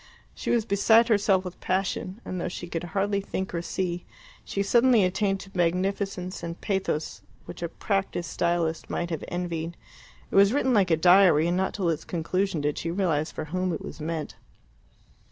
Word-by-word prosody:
She -, -, -5 dB
was 235 Hz, -3 st, +2 dB
beside 225 Hz, +3 st, +4 dB
herself 200 Hz, -3 st, +3 dB
with 180 Hz, -, -7 dB
passion, 190 Hz, +2 st, -2 dB
and 185 Hz, -1 st, -4 dB
though -, -, -2 dB
she 175 Hz, -, -6 dB
could 170 Hz, 0 st, -4 dB
hardly 200 Hz, +4 st, 0 dB
think 190 Hz, -1 st, -4 dB
or 170 Hz, -, -1 dB
see, 175 Hz, 0 st, -3 dB, 0.4 s
she 200 Hz, -, -2 dB
suddenly 235 Hz, +1 st, +4 dB
attained 195 Hz, +2 st, +1 dB
to 195 Hz, -, -12 dB
magnificence 185 Hz, +1 st, -1 dB
and 170 Hz, 0 st, -6 dB
pathos 190 Hz, -6 st, -2 dB, 0.2 s
which -, -, -9 dB
a 170 Hz, -, -2 dB
practised 195 Hz, -3 st, -2 dB
stylist 170 Hz, -1 st, 0 dB
might 175 Hz, 0 st, -2 dB
have 160 Hz, -, -3 dB
envied. 170 Hz, -1 st, -4 dB, 0.5 s
It -, -, -4 dB
was 200 Hz, +3 st, +6 dB
written 265 Hz, -2 st, +2 dB
like 200 Hz, -5 st, +3 dB
a 160 Hz, -, +4 dB
diary, 175 Hz, -2 st, +6 dB
and 175 Hz, -, +1 dB
not 190 Hz, +1 st, 0 dB
till 190 Hz, -4 st, -1 dB
its 160 Hz, -, -1 dB
conclusion 180 Hz, 0 st, -1 dB
did 145 Hz, 0 st, -1 dB
she 165 Hz, -, -3 dB
realize 165 Hz, -4 st, 0 dB
for 155 Hz, -, -5 dB
whom 185 Hz, 0 st, 0 dB
it -, -, -5 dB
was -, -, -8 dB
meant. 160 Hz, 0 st, -4 dB
185 Hz, 185 wpm, -26 LUFS, 170-195 Hz, 0.5 s, was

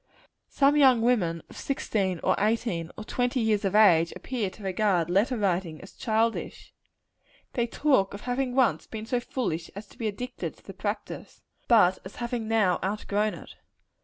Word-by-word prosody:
Some 280 Hz, +1 st, +3 dB
young 260 Hz, -5 st, +5 dB
women, 180 Hz, -10 st, +1 dB
of -, -, -15 dB
sixteen, 195 Hz, -9 st, -2 dB
or -, -, +3 dB
eighteen, 210 Hz, -6 st, 0 dB
or 215 Hz, -, -6 dB
twenty 245 Hz, +3 st, -1 dB
years 220 Hz, -3 st, +1 dB
of 195 Hz, 0 st, 0 dB
age, 170 Hz, -6 st, +5 dB
appear 235 Hz, -7 st, -3 dB
to 195 Hz, +3 st, -14 dB
regard 185 Hz, -3 st, +1 dB
letter 215 Hz, +7 st, +2 dB
writing 180 Hz, -6 st, -1 dB
as 195 Hz, -, -13 dB
childish. 225 Hz, +1 st, -2 dB, 0.8 s
They 240 Hz, -1 st, 0 dB
talk 230 Hz, -7 st, +1 dB
of 200 Hz, -, -9 dB
having 250 Hz, 0 st, -2 dB
once 260 Hz, -3 st, +2 dB
been 220 Hz, -1 st, -6 dB
so 245 Hz, +2 st, 0 dB
foolish 175 Hz, -10 st, -3 dB
as 205 Hz, +2 st, -7 dB
to -, -, -19 dB
be 225 Hz, -, -1 dB
addicted 245 Hz, +5 st, -5 dB
to -, -, -23 dB
the -, -, -9 dB
practice; -, -, -6 dB, 0.2 s
but 190 Hz, -6 st, +5 dB
as 190 Hz, -, -10 dB
having 240 Hz, -2 st, -3 dB
now 215 Hz, -5 st, +2 dB
outgrown 210 Hz, +1 st, -1 dB
it. -, -, -12 dB
215 Hz, 170 wpm, -27 LUFS, 190-245 Hz, 0.8 s, young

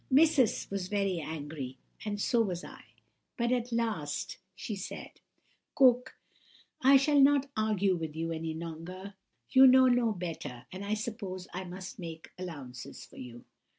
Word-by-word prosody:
"Missus 280 Hz, -3 st, +4 dB
was 195 Hz, -2 st, -2 dB
very 195 Hz, -3 st, 0 dB
angry, 145 Hz, -4 st, -5 dB, 0.3 s
and 205 Hz, -1 st, -3 dB
so 235 Hz, +3 st, +3 dB
was 185 Hz, -5 st, -2 dB
I; -, -, -11 dB, 0.5 s
but 235 Hz, 0 st, +1 dB
at 245 Hz, -1 st, 0 dB
last 220 Hz, -11 st, -2 dB, 0.2 s
she 215 Hz, -, -4 dB
said:— 195 Hz, -, -8 dB, 0.5 s
"'Cook, 250 Hz, -1 st, +4 dB, 0.7 s
I 270 Hz, +2 st, +8 dB
shall 285 Hz, +2 st, +3 dB
not 280 Hz, 0 st, +4 dB
argue 205 Hz, -3 st, +2 dB
with 160 Hz, -3 st, -5 dB
you 165 Hz, +1 st, -2 dB
any 160 Hz, 0 st, -3 dB
longer; 170 Hz, +4 st, -7 dB, 0.4 s
you 265 Hz, 0 st, +9 dB
know 260 Hz, 0 st, +7 dB
no 245 Hz, -2 st, +4 dB
better, 160 Hz, -, -5 dB
and 185 Hz, +2 st, -6 dB
I 205 Hz, +1 st, 0 dB
suppose 210 Hz, -5 st, -5 dB
I 185 Hz, +1 st, -4 dB
must 185 Hz, +6 st, -8 dB
make 165 Hz, -2 st, -8 dB
allowances 140 Hz, -9 st, -7 dB
for -, -, -17 dB
you. 120 Hz, -1 st, -9 dB
195 Hz, 150 wpm, -31 LUFS, 165-240 Hz, 0.7 s, you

